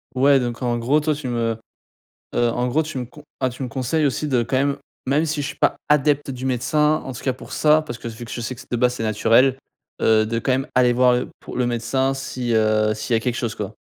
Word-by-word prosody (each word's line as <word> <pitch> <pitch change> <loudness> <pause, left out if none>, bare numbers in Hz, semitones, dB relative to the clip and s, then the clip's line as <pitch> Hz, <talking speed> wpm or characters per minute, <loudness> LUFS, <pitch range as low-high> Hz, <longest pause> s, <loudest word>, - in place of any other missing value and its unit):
Ouais, 135 +1 +5
donc 120 0 -4
en 120 -1 0
gros, 130 +6 +2
toi, 155 0 0
tu 145 -3 -5
me 115 -2 -1 0.8
heu, 120 -1 +3
en 125 +1 -1
gros, 150 +6 +1
tu 150 -4 -5
me 125 - -4
con 145 +5 -15 0.2
ah, 130 -1 +1
tu 125 +2 -7
me - - -3
conseilles 130 +6 0
aussi, 140 +2 -1
de 125 -4 +2
quand 120 +3 -2
même 140 +1 +1 0.3
même 145 +4 +2
si 155 -2 -2
je 140 - -3
suis - - -6
pas - - +2
adepte 145 -1 +2
du 130 0 -6
médecin, 150 +4 +1
en 130 - -6
tout 120 - -9
cas 130 - +1
pour 130 - -12
ça, 155 0 +4
parce 120 -6 -7
que - - -7
s 115 - -6
vu 120 - -8
que 115 - -10
je 120 - -4
sais 120 - -3
que 120 - -11
s - - -16
de - - -1
base, 125 +1 +2
c'est 115 - -4
naturel, 115 +4 +3 0.4
heu, 110 -1 +4
de 115 +1 -1
quand 130 - 0
même 135 +2 0
aller 125 -1 +4
voir 125 0 +4
le 125 - -2
pour - - -8
le 125 - +2
médecin 120 +3 0
si, 130 -3 -3
heu 110 -1 +3
s'il 110 +2 -1
y - - +4
a - - 0
quelque 120 +1 -2
chose, 120 -2 -3
quoi? - - -5
125 Hz, 280 wpm, -22 LUFS, 120-140 Hz, 0.8 s, Ouais